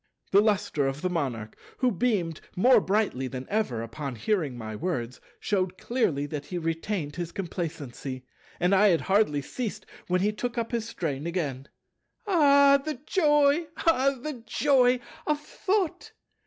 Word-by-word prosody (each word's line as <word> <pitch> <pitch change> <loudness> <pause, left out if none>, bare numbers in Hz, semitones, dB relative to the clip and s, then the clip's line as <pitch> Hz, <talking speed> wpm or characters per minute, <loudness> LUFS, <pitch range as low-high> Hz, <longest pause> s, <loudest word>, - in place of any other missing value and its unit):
The 200 - +6
lustre 200 -9 +1
of 135 +2 -4
the 185 - 0
Monarch, 125 -10 -3 0.2
who 255 -1 +2
beamed 190 -7 0
more 250 +8 +6
brightly 195 -11 0
than 130 0 -6
ever 200 - -1
upon 125 +4 -5
hearing 150 - -1
my 110 -2 -6
words, 125 -5 -3 0.2
shewed 185 -2 -1
clearly 170 - 0
that 145 -1 -6
he 180 - -4
retained 165 -1 -3
his 175 -1 -4
complacency; 150 -8 -5 0.3
and 180 +2 +2
I 200 +2 +6
had 170 -5 +3
hardly 190 -8 +2
ceased 235 - -5 0.2
when 180 0 +1
he 205 +2 +2
took 240 +3 -4
up 230 +1 -2
his 230 -1 -2
strain 155 -8 -3
again. 145 -6 -3 0.6
"Ah, 280 -7 +5
the 310 0 -3
joy, 295 -2 +3 0.2
ah, 275 -4 +3
the 265 -2 -6
joy 250 +1 +3 0.3
of 300 -1 +1
Thought! 375 +3 -2
185 Hz, 155 wpm, -27 LUFS, -, 0.6 s, The